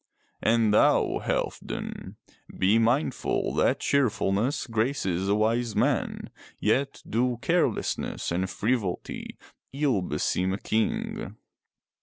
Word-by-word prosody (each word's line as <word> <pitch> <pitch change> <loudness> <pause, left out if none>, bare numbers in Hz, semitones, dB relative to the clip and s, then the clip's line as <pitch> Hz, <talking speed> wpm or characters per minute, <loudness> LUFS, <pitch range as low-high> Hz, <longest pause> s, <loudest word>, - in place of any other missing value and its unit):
And 115 -2 +3
thou, - - +4
Halfdan, - - -3 0.4
be 100 +4 +4
mindful 125 +4 +1
that - - +2
cheerfulness 120 -2 +1
graces 110 -6 -1
a 100 - +3
wise 115 +1 +1
man, - - 0 0.3
yet 135 +1 0
do 120 +2 0
carelessness 175 - 0
and 90 +2 -1
frivolity 105 -5 -2 0.3
ill 135 -7 +1
beseem 90 +3 -1
a - - -1
King." 110 +1 -2
115 Hz, 100 wpm, -27 LUFS, 95-125 Hz, 0.4 s, thou